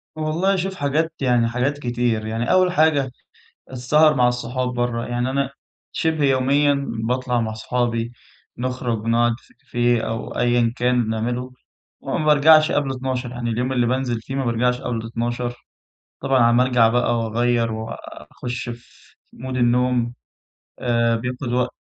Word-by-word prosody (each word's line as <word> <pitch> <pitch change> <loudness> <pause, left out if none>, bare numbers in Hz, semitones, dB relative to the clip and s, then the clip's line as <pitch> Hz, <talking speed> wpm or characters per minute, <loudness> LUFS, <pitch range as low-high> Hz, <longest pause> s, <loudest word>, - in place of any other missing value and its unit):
والله 160 +6 0
شوف 190 +1 -2
حاجات 160 +2 0
يعني 120 -3 +3
حاجات 130 +5 -1
كتير، 120 -3 -1
يعني 115 +2 -2
أول 185 -1 +4
حاجة، 155 -6 +2 0.6
السهر 150 +4 +3
مع 125 -1 +4
الصحاب 125 +1 -2
برّا، 120 -1 -1
يعني 120 +1 -1
أنا 135 0 0 0.4
شّبه 160 -3 0
يوميًا 140 +1 +2 0.2
باطلع 125 0 0
مع 110 -1 -2
صحابي، 115 0 -2 0.5
نخرج 125 -3 -3
نقعد 120 +1 +3
في - - -25
كافية 120 -1 0
أو 115 0 -4
أيًا 120 -1 +2
كان 125 0 +2
بنعمله 120 +3 -2 0.5
وما 155 - -2
بارجعش 155 +2 +6
قبل 140 -2 0
00:00 130 -1 -3
يعني 120 -1 -4
اليوم 125 +3 -1
اللي 120 -2 +2
بانزل 125 -2 -1
فيه 135 +4 -6
ما 135 -2 -1
بارجعش 125 +2 +1
قبل 115 -3 -3
00:00 120 +1 -3 0.7
طبعًا 135 -1 +1
على 120 0 +5
ما 125 - +5
أرجع 125 -3 +4
بقى 120 0 +1
وأغيّر 115 +1 0
وأخُش 120 +2 -7
في 120 0 -13 0.2
مود 130 +1 -5
النوم، 120 0 +2 0.7
آآ، 115 -1 +1
بياخد 125 +1 -4
وقت 125 0 0
125 Hz, 150 wpm, -21 LUFS, 120-135 Hz, 0.7 s, بارجعش